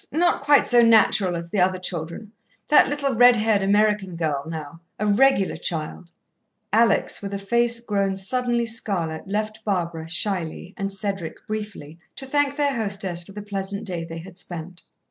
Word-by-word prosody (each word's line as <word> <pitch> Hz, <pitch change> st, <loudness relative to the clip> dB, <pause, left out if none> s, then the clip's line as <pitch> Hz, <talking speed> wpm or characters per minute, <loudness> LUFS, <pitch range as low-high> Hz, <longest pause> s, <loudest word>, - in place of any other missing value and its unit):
Not 340 Hz, +2 st, +2 dB
quite 285 Hz, 0 st, +5 dB
so 240 Hz, -1 st, +5 dB
natural 215 Hz, -5 st, +4 dB
as 170 Hz, 0 st, -6 dB
the 205 Hz, -, 0 dB
other 185 Hz, +1 st, +3 dB
children. 180 Hz, +3 st, -5 dB, 0.4 s
That 300 Hz, -, +6 dB
little, 280 Hz, -2 st, -1 dB
red 245 Hz, +1 st, +7 dB
haired 215 Hz, -2 st, +2 dB
American 205 Hz, -2 st, +2 dB
girl, 150 Hz, -4 st, -2 dB
now 160 Hz, -1 st, -7 dB, 0.2 s
a 210 Hz, -, -2 dB
regular 210 Hz, -1 st, +3 dB
child 165 Hz, +1 st, -4 dB, 0.3 s
" -, -, -51 dB, 0.3 s
Alex, 230 Hz, +2 st, +3 dB
with 200 Hz, 0 st, -4 dB
a -, -, -1 dB
face 235 Hz, +4 st, +1 dB
grown 200 Hz, -4 st, -1 dB
suddenly 240 Hz, +4 st, 0 dB
scarlet, 190 Hz, -7 st, -2 dB
left 215 Hz, +2 st, -3 dB
Barbara, 170 Hz, -5 st, -2 dB
shyly, 180 Hz, 0 st, -2 dB
and 195 Hz, -1 st, -3 dB
Cedric, 195 Hz, -4 st, -4 dB
briefly, 210 Hz, -8 st, -6 dB, 0.2 s
to 270 Hz, -, -3 dB
thank 285 Hz, +1 st, +1 dB
their 285 Hz, -1 st, +1 dB
hostess 195 Hz, -5 st, -2 dB
for 195 Hz, -, -13 dB
the 210 Hz, 0 st, -7 dB
pleasant 200 Hz, 0 st, -4 dB
day 175 Hz, -4 st, -4 dB
they 165 Hz, 0 st, -7 dB
had 180 Hz, +2 st, -10 dB
spent. 175 Hz, 0 st, -8 dB
200 Hz, 170 wpm, -23 LUFS, 175-225 Hz, 0.4 s, red